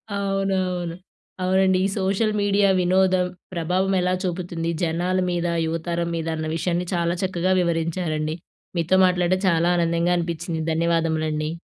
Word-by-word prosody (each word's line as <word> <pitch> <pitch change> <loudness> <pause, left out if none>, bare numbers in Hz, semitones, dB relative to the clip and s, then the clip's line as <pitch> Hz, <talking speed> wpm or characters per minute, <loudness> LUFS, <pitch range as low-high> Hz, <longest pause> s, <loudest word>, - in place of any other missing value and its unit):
అవునవును. 190 -3 -1 0.5
అవునండి. 190 0 +3
ఈ - - +3
సోషల్ 200 +3 +1
మీడియా 200 0 +3
వినోదం, 185 0 +3 0.3
ప్రభావం 180 +3 0
ఎలా 180 0 +1
చూపుతుంది 170 -2 -2
జనాల 175 +3 0
మీద, 175 0 -1 0.2
యువతరం 170 +1 -2
మీద 165 -1 -3
అన్న 155 0 -4
విషయాన్ని, 175 +1 -1
చాలా 170 0 0
చక్కగా 185 0 +1
వివరించారండి. 165 -2 -1 0.4
మీతో 170 +3 +2
మాట్లాడం 180 0 +1
చాలా 170 +1 +2
ఆనందంగా 170 +1 +1
అనిపించింది. 170 -1 -3
ధన్యవాదములండి. 160 -2 0
175 Hz, 125 wpm, -23 LUFS, 165-185 Hz, 0.5 s, అవునండి